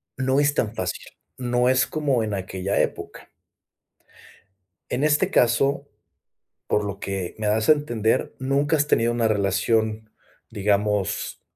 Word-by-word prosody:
no 130 +1 +1
es 145 0 +3
tan 115 -5 -1
fácil, 95 -3 -4 0.3
no 125 0 +1
es 130 0 +3
como 140 -6 0
en 105 -1 -3
aquella 95 0 -2
época. - - -5 1.6
En 130 - -2
este 150 0 +2
caso, 140 +4 +2 0.8
por 105 - 0
lo 100 -1 -5
que 95 -3 -4
me 110 - -4
das 110 +1 +1
a - - +10
entender, 120 -5 -1
nunca 140 +3 +1
has 150 -1 +1
tenido 115 -4 +2
una 120 -1 +1
relación, 110 +2 0 0.4
digamos 105 -1 -1
115 Hz, 135 wpm, -23 LUFS, 105-135 Hz, 1.6 s, a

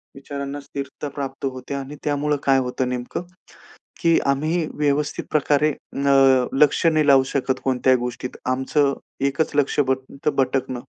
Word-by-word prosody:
विचारांना 140 +1 -6
स्थिरता 140 +1 -6
प्राप्त 135 -1 -5
होते 130 0 -5
आणि 140 +1 -6
त्यामुळं 150 0 0
काय 135 -1 +4
होतं 125 0 -2
नेमकं, 125 +6 -4 0.8
की 165 -2 +4
आम्ही 155 +5 +1
व्यवस्थित 145 0 0
प्रकारे 150 0 +2
अ, 135 -3 +3
लक्ष 145 +4 +3
नाही 155 -2 +3
लावू 135 -2 +6
शकत 130 -1 -1
कोणत्याही 130 0 +3
गोष्टीत. 125 +1 -5
आमचं 135 +2 +1 0.3
एकच 140 +3 -1
लक्ष 145 0 +1
भट 130 +1 -1
भटकणं. 130 -2 0
140 Hz, 135 wpm, -22 LUFS, 130-145 Hz, 0.8 s, लावू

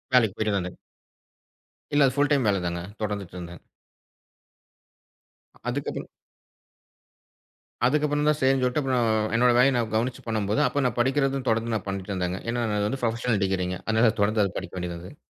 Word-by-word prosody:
வேலைக்கு 110 -5 +4
போயிட்டு 105 -1 0
வந்தேங்க. 90 -1 -3 1.2
இல்ல 145 -1 +5
அது 130 - -2
புல் 145 0 +3
டைம் 140 -3 +3
வேல 100 - +2
தாங்க, 85 0 -2 0.2
தொடர்ந்துட்டு 100 -4 -4
இருந்தேன். 85 -1 -8 2.1
அதுக்கப்புறம் 140 +3 -4 1.8
அதுக்கப்புறம் 145 +2 +2
தான் 150 -1 +3
சரினு 135 0 +3
சொல்ட்டு 125 +3 +1
அப்புறம், 130 -3 +1 0.3
என்னோட 125 +1 +5
வேலைய 130 +2 +5
நான் 115 -2 0
கவனிச்சு 120 +3 -1
பண்ணும்போது, 110 0 0
அப்போ 145 - -1
நான் 125 - -1
படிக்குறதும் 135 +1 +1
தொடர்ந்து 115 +1 0
நான் 105 - -3
பண்ணிட்டு 95 0 -4
இருந்தேங்க. 90 0 -2
ஏன்னா 120 0 0
அது 105 - +1
வந்து 135 +4 -3
புரொபஷனல் 115 -2 0
டிகிரிங்க 90 -1 -1
அதனால, 110 +1 +3
அது - - -5
தொடர்ந்து 100 -2 +1
படிக்க - - -9
வேண்டியது 90 -1 -4
இருந்தது. 90 - -11
115 Hz, 155 wpm, -26 LUFS, 100-130 Hz, 2.1 s, இல்ல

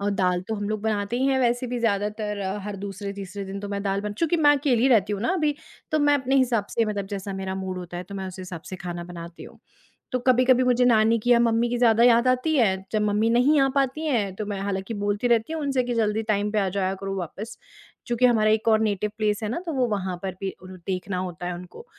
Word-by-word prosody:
और 205 +1 0
दाल 180 -2 +1
तो 220 - -1
हम 205 -1 -3
लोग 215 -1 -2
बनाते 215 +1 -1
ही 265 - +1
हैं 270 -1 +2
वैसे 245 +1 +1
भी 245 0 -3
ज़्यादातर, 210 -1 -1 0.2
हर 205 0 -5
दूसरे-तीसरे 200 0 -6
दिन 195 +1 -6
तो 205 - -6
मैं 200 0 -3
दाल 195 0 0
बन 210 0 -4
चूँकि 330 +8 0
मैं 295 -2 +5
अकेली 265 -3 +2
रहती 210 -5 +3
हूँ 200 - -3
ना 235 - 0
अभी, 305 -5 +1 0.4
तो 310 - +3
मैं 290 -1 +4
अपने 270 -1 +1
हिसाब 240 -6 +2
से 230 - +1
मतलब 205 -2 -3
जैसा 195 0 -5
मेरा 190 0 -4
मूड 190 -1 -4
होता 175 -1 -7
है, 175 - -4
तो 200 +2 -10
मैं 190 -1 -4
उस 185 - -10
हिसाब 180 -2 -7
से 185 - -5
खाना 175 -1 -6
बनाती 170 -1 -9
हूँ। - - -14 0.5
तो 255 - 0
कभी-कभी 255 0 +4
मुझे 250 0 +3
नानी 225 -1 +4
की 245 - -1
या 235 - +6
मम्मी 235 0 +2
की 245 - -1
ज़्यादा 235 -1 +4
याद 240 0 +5
आती 255 +5 +2
है, 220 -8 +3 0.2
जब 215 - +1
मम्मी 210 +2 +2
नहीं 255 +6 +4
आ 270 - +4
पाती 275 +3 0
हैं, 215 -9 0
तो 215 - -4
मैं 205 -1 -4
हालाँकि 195 +2 -3
बोलती 205 +3 0
रहती 235 +5 +2
हूँ 320 - -3
उनसे 270 -3 0
कि, 245 0 -2
"जल्दी 220 -1 +1
टाइम 210 -1 0
पे 215 - +1
आ 195 - +1
जाया 190 0 -1
करो 195 0 -3
वापस।" 195 +5 -6 0.5
चूँकि 240 0 +2
हमारा 220 -3 +4
एक 220 +1 0
और 220 -1 +5
नेटिव 210 -1 0
प्लेस 210 0 0
है - - -1
ना, - - -2
तो 335 - -3
वो 260 -3 +2
वहाँ 190 -4 -2
पर 190 - -2
भी 195 -1 -2
उर 185 - -10 0.2
देखना 185 0 -2
होता 180 -1 -5
है 180 - -2
उनको। 180 - -11
215 Hz, 260 wpm, -25 LUFS, 195-245 Hz, 0.5 s, या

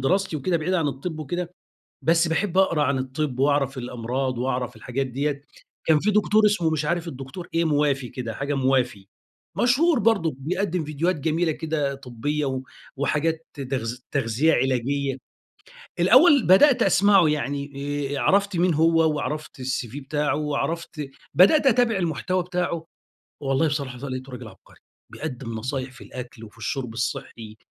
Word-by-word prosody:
دراستي 185 +5 +1
وكده 170 +5 0
بعيد 165 +3 -1
عن 165 -5 +1
الطِب 150 +4 -5
وكده، 175 +4 -4 0.5
بس 165 +3 +3
باحب 180 +3 0
أقرا 170 -5 +3
عن 140 -1 +1
الطِب 130 +1 -3
وأعرف 140 -1 +1
الأمراض 125 +1 -3
وأعرف 125 -1 -2
الحاجات 130 +4 -3
ديّة. 140 +2 -2 0.4
كان 160 -1 +5
في 210 - +2
دكتور 210 +1 +4
اسمه 205 -6 +2
مش 155 -1 -1
عارف 170 +2 -1
الدكتور 135 +5 -8
إيه 165 0 +2
موافي 145 -4 +1
كده، 120 -3 -5
حاجة 140 +4 -2
موافي. 130 -7 0 0.5
مشهور 280 +6 +3
برضه 200 - +2
بيقدّم 180 +3 -1
فيديوهات 155 +5 -1
جميلة 160 +3 0
كده 155 -3 -2
طبّية 135 +3 -3
و 130 -1 -2 0.3
وحاجات 160 +3 -1
ت 145 - -9
تغذ 125 -3 -3
تغذية 135 +4 +2
علاجية. 135 +2 0 0.8
الأول 290 -8 +6
بدأت 250 +9 +6
أسمعه. 195 -4 +5
يعني 140 -1 -2 0.4
آآ - - -2
عرفت 200 +8 +2
مين 175 0 +2
هو 160 0 +3
وعرفت 150 -1 -4
الCV 130 -1 -3
بتاعه 145 +1 -1
وعرفت 150 0 -3 0.2
بدأت 275 - +6
أتابع 245 -3 +4
المحتوى 180 +1 -1
بتاعه، 175 -2 -2 0.6
والله 135 +3 +1
بصراحة 140 -4 -3
لقيته 130 0 -6
راجل 125 -2 -8
عبقري. 100 - -17 0.3
بيقدّم 120 -2 -6
نصايح 130 +3 -4
في 125 - -13
الأكل، 120 -2 -9
وفي 110 +2 -13
الشُرب 125 0 -4
الصحّي 120 -3 -5
145 Hz, 150 wpm, -24 LUFS, 130-170 Hz, 0.8 s, الأول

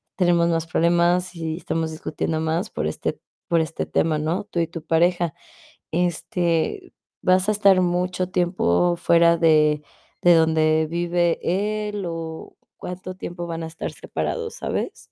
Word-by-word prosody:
tenemos 175 -2 +3
más 165 -1 0
problemas 175 +2 +2
y 160 -1 -3
estamos 165 -2 -2
discutiendo 160 0 -3
más 165 +6 -1
por - - -2
este - - -3 0.3
por 170 -1 +3
este 160 0 -3
tema", 160 -1 +1
¿no? 160 +6 -2
Tú 180 -4 -4
y 165 - +2
tu 165 -1 -7
pareja. 170 0 +1 0.6
Este, 175 - -1 0.3
¿vas 185 +2 +3
a - - +4
estar 200 -3 +4
mucho 180 +1 0
tiempo 175 - +2
fuera 170 0 +4
de 155 -2 +3 0.4
de 175 -1 +7
donde 160 -1 +3
vive 175 0 +1 0.5
él 205 -2 -4
o 165 -1 -6 0.2
cuánto 185 +1 -7
tiempo 175 -1 -6
van 165 0 -4
a - - -4
estar 160 - -5
separados, 460 -1 -4
sabes? - - -4
170 Hz, 145 wpm, -23 LUFS, 160-180 Hz, 0.6 s, de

